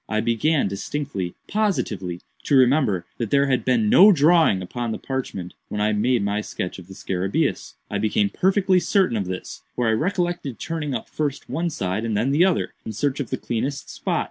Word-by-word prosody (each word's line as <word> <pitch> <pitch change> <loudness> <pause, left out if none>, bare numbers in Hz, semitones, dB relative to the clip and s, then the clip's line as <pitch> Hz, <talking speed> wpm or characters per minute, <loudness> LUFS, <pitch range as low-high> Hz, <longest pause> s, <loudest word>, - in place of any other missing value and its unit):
I 110 - 0
began 120 +5 +1
distinctly, 100 -1 -4
positively, 105 - -1 0.2
to 145 - +2
remember 130 - +3
that 115 -3 -2
there 140 +3 +3
had 130 -2 +1
been 120 -4 +2
no 200 - +8
drawing 160 - +4
upon 120 +5 -4
the - - -3
parchment 110 -9 -5 0.2
when 105 - -3
I 105 +1 +2
made 115 +1 +1
my 100 +1 0
sketch 95 -3 -5
of 90 - -13
the 95 - -11
scarabæus. 95 +1 -2
I 100 - -3
became 105 -1 +1
perfectly 190 0 +3
certain 185 - +2
of 100 -3 -1
this; 95 0 -6
for 120 -2 0
I - - +3
recollected 175 - -1
turning 155 -5 -3
up 115 - -5
first 145 -2 -3
one 170 +1 -1
side 95 - -2
and 110 -3 -1
then 120 +6 +1
the 150 +5 +4
other, 190 -3 0
in 110 - -6
search 140 +6 -1
of 135 - -3
the - - -2
cleanest 135 +4 -3
spot. - - -1
120 Hz, 195 wpm, -23 LUFS, 105-150 Hz, 0.2 s, no